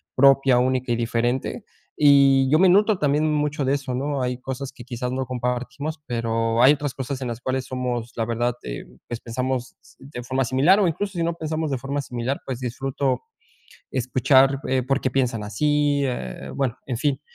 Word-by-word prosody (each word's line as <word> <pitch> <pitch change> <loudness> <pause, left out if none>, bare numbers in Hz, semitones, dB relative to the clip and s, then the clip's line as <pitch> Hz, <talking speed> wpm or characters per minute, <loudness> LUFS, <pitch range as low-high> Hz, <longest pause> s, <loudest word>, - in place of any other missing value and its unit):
propia, 135 -1 +5
única 130 -1 0
y - - +3
diferente. 120 +2 -1 0.3
Y 140 -2 +6
yo 155 - +5
me 190 - +6
noto 205 +2 +4
también 150 +2 +2
mucho 150 -1 0
de 135 - +2
eso, 135 -2 -2
¿no? 140 +1 -2
Hay 125 0 -2
cosas 130 +1 -5
que 125 - -12
quizás 125 0 -4
no 130 0 -2
compartimos, 125 +5 -3
pero 115 -1 0
hay 135 +3 +8
otras 145 -2 -3
cosas 135 0 -4
en 130 - -3
las 120 0 -6
cuales 130 0 -2
somos 125 -2 -3
la 115 - -1
verdad, 120 +1 0
eh, - - -6 0.2
pues 120 - -5
pensamos 125 +1 -3 0.2
de 135 -2 -8
forma 130 +1 -1
similar, 140 - +4
o 195 - +3
incluso, 195 +5 -2
si 170 -2 -1
no 170 - 0
pensamos 155 -2 -3
de 135 - 0
forma 140 +3 -3
similar, 125 +2 -3
pues 130 -2 -4
disfruto 135 - -2 0.7
escuchar, 130 +2 +3
eh, 130 0 +1
por 135 +2 0
qué - - 0
piensan 120 -5 0
así, 145 +6 +1
eh, 95 - -4
bueno, 135 -4 -1
en 125 -4 -3
fin. 140 -1 0
130 Hz, 190 wpm, -23 LUFS, 125-140 Hz, 0.7 s, hay